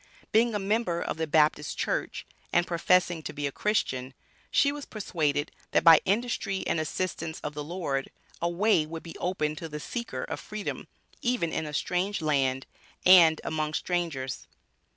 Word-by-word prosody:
Being 225 0 +3
a - - +2
member 200 -3 0
of - - -3
the 160 0 -1
Baptist 150 -1 +2
Church, - - -2 0.3
and 175 0 +3
professing 175 0 +2
to - - -6
be 145 -1 -3
a 140 - -1
Christian, 130 -10 -1 0.3
she 280 - +3
was 290 0 -6
persuaded 155 -8 -1 0.2
that, - - +4
by 165 -2 +9
industry 200 -1 -1
and - - 0
assistance 160 0 -3
of 150 - -4
the 150 0 -5
Lord, 150 -5 -3 0.3
a 170 - +1
way 180 -1 +3
would 165 0 -7
be 165 - -9
opened 155 -4 -1
to 165 - -6
the 150 0 -5
seeker 235 +9 -4
of - - -5
Freedom 210 -1 -5 0.3
even 235 -10 0
in 160 - -2
a - - -5
strange 185 +7 0
land 135 -4 +1 0.4
and 170 -4 +8
among 155 -1 -2
strangers. 165 -8 -2
165 Hz, 170 wpm, -28 LUFS, 150-195 Hz, 0.4 s, by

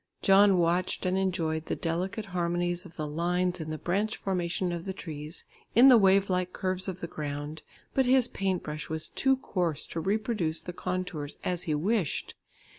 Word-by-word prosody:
John 195 0 +6
watched 175 +2 +1
and 185 0 +1
enjoyed 165 -5 -1
the - - -1
delicate 185 +6 -2
harmonies 175 0 -1
of 175 - -13
the 155 - -3
lines 175 +4 0
in 155 - -5
the 155 - -3
branch 200 +7 -1
formation 180 -1 -1
of 170 -1 -4
the 190 - -3
trees, 155 -2 -7 0.3
in 250 +4 +9
the 250 - +9
wave 195 0 +5
like 180 -1 -1
curves 185 -1 -1
of 185 -1 -5
the 170 - -3
ground, 150 -1 -5 0.3
but 265 -2 +2
his 255 -1 +5
paint 190 -5 -1
brush 150 0 -5
was 160 0 -2
too 270 0 +2
coarse 175 - -1
to 165 - -2
reproduce 195 -3 0
the 180 - -7
contours 180 -5 -4
as 180 0 -1
he 150 - +2
wished. 185 - 0
180 Hz, 185 wpm, -29 LUFS, 165-195 Hz, 0.3 s, in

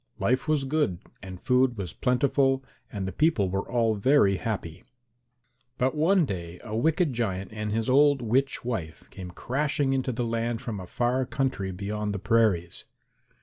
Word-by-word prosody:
Life 130 +5 0
was 155 -3 +2
good 140 - 0 0.2
and 95 -1 -8
food 125 0 +2
was 95 -3 -5
plentiful 135 +1 +1 0.3
and 100 -3 -4
the - - -3
people 105 - +1
were 95 +3 -3
all 115 -2 +2
very 105 -2 +3
happy. 95 -7 -4 0.9
But 130 +1 +1
one 165 +3 +3
day 85 -6 -6
a 110 -2 -5
wicked 160 +5 +1
giant 100 -4 -3
and 105 -1 -3
his 110 +1 -1
old 145 +2 +5
witch 125 +3 0
wife 90 -11 -4
came 95 -2 -8
crashing 135 - -1
into 130 -1 0
the 120 0 -2
land 115 0 -1
from 115 -5 -5
a 90 - -8
far 125 +6 0
country 135 -8 -1
beyond 105 +2 -3
the - - -1
prairies. 100 -5 +1
115 Hz, 165 wpm, -27 LUFS, 100-135 Hz, 0.9 s, old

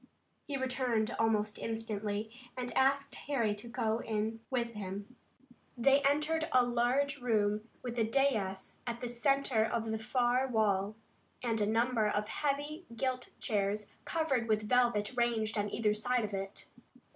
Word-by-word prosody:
He 280 - -2
returned 250 -4 0
almost 215 -2 +1
instantly, 215 -1 -3 0.3
and 245 -1 -4
asked 275 +1 +3
Harry 235 -7 0
to 205 +3 -7
go 230 -2 0
in 220 0 -2
with 240 -3 0
him. 200 +3 -6 0.6
They 275 +4 +5
entered 300 +3 +2
a 250 -1 +5
large 250 +4 +1
room, 215 -2 +1
with 245 -1 -3
a - - +4
dais 220 -6 0
at 235 0 -2
the 245 - -3
center 255 -1 +2
of 225 0 -1
the 220 - -1
far 245 +3 +2
wall, 210 -3 +1 0.5
and 225 -3 0
a 205 - +2
number 225 0 +2
of 210 0 -1
heavy 295 +6 -2
gilt 255 +1 -2
chairs 205 -1 0
covered 280 -8 0
with 215 -1 +1
velvet 240 -2 +2
ranged 230 -3 +1
on 205 -1 0
either 215 -2 +2
side 235 +2 +1
of 205 - -7
it. 195 0 -4
230 Hz, 150 wpm, -33 LUFS, 215-255 Hz, 0.6 s, They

